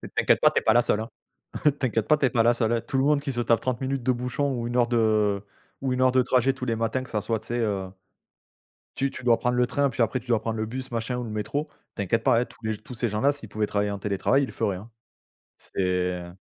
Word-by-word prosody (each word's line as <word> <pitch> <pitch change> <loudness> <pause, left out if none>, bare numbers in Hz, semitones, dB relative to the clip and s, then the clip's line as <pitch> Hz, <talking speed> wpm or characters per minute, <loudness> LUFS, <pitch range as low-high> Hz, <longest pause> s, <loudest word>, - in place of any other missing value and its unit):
T'inquiètes - - +3
pas, - - +6
tu - - +2
es - - -12
pas 110 - +4
la 120 - +5
seule 110 -3 +1
hein. 110 - -6 0.7
T'inquiètes 115 -4 0
pas, 150 - +5
tu 140 - +2
es - - +3
pas 115 - +3
la 120 +1 +5
seule 115 -1 +1
hein. 115 - 0
Tout 135 - -3
le 135 - +3
monde 145 0 +3
qui 140 - -3
se 120 -2 -1
tape 115 -1 +3
30 125 -2 -1
minutes 135 0 -1
de 130 - +3
bouchon 125 +3 -1
ou 120 -2 -3
1 120 - -4
heure 120 -1 +4
de 110 -4 +2 0.4
ou 135 -1 0
1 125 - -1
heure 130 0 +5
de 130 0 +4
trajet 130 +2 +2
tous 130 -1 -6
les 115 -2 0
matins 115 +3 -1
que 130 - -11
ça 105 - -1
soit 110 +1 -1
tu 110 - -15
sais, 120 +1 -2
heu 100 -4 -1 1.1
tu 135 0 0
tu 130 - -9
dois 120 -2 +4
prendre 125 0 0
le 125 0 +3
train, 140 +2 +1
puis 125 - -3
après 130 +3 0
tu 125 - -19
dois 115 -2 +2
prendre 110 0 -3
le 110 - -1
bus 130 +3 -6
machin 115 +2 -2
ou 125 - -3
le 115 - -6
métro, 110 +8 -2 0.3
t'inquiète 110 +3 0
pas 115 - +4
hein, - - -1
tous 115 - -20
les 110 -1 -1
tous 115 +5 -11
ces 120 0 -1
gens-là 110 +7 +2
s'ils 130 -7 -10
pouvaient 105 0 -1
travailler 100 0 0
en 100 - -4
télétravail 105 +7 +1
il - - -2
le - - -9
feraient, 95 -2 -1
hein. 105 +5 -11 0.7
C'est - - -5
heu 90 -1 -1
115 Hz, 290 wpm, -26 LUFS, 110-130 Hz, 1.1 s, pas